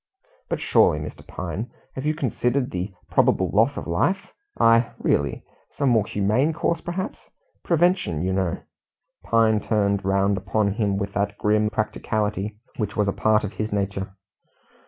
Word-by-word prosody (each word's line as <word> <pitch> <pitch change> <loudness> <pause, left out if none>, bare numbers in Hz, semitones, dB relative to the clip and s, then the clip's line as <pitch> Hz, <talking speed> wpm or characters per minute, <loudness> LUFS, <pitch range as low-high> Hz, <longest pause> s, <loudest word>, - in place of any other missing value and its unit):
"But - - -1
surely, - - +4
Mr. - - -7
Pine, - - -5 0.2
have 135 +3 -4
you 155 - +1
considered 125 -2 0
the 90 +2 -3 0.2
probable - - +3
loss - - +3
of - - -4
life? 100 - 0 0.3
I 115 +1 +4
really 70 -2 0 0.3
some 140 - +1
more 110 -4 +3
humane 110 +10 +1
course 165 +1 -1
perhaps? 185 +4 -5 0.3
Prevention, 170 - +2
you 95 +1 0
know 95 -3 -1 0.3
" - - -49
Pine 110 -2 +4
turned 100 -2 +1
round 100 +1 +2
upon 100 +2 0
him 105 -3 0
with 100 -1 -3
that 100 0 -1
grim 105 0 +2
practicality 105 -1 -2 0.2
which 105 -3 -3
was 105 -1 +2
a 100 - +1
part 110 0 +2
of 105 - -4
his 110 0 -3
nature. 100 -1 -2
105 Hz, 155 wpm, -24 LUFS, 100-115 Hz, 0.3 s, surely